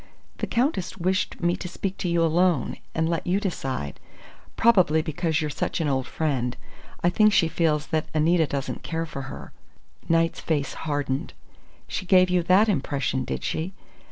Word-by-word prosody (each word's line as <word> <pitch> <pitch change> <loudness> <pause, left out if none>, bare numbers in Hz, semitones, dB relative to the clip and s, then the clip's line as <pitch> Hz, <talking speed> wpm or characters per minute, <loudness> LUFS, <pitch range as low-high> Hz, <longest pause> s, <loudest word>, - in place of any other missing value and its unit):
"The - - -2
Countess 235 - 0
wished 185 +2 -1
me 175 0 +2
to 180 - -6
speak 190 +2 -4
to 180 - -1
you 170 0 +2
alone, 165 -3 +2 0.2
and 160 0 +1
let 165 0 -2
you 185 +3 +2
decide. 135 - -3 0.6
Probably 180 -9 +4
because 160 0 -1
you're 150 -1 -2
such - - -2
an 160 - 0
old 130 -2 0
friend. 130 -6 -1 0.5
I 175 - +4
think 215 +3 +5
she 170 -4 +4
feels 160 -2 +1
that 155 -1 +1
Anita 160 +1 +3
doesn't 140 +1 -3
care 165 0 -3
for 140 -4 -6
her." - - -9 0.6
Knight's 165 0 +2
face 145 -4 -1 0.2
hardened. 145 0 -2 0.5
"She 185 - -4
gave 185 -1 +5
you 180 -1 +3
that 185 +6 +4
impression, 135 - -1
did - - -4
she? 170 +5 -2
165 Hz, 170 wpm, -25 LUFS, 150-180 Hz, 0.6 s, think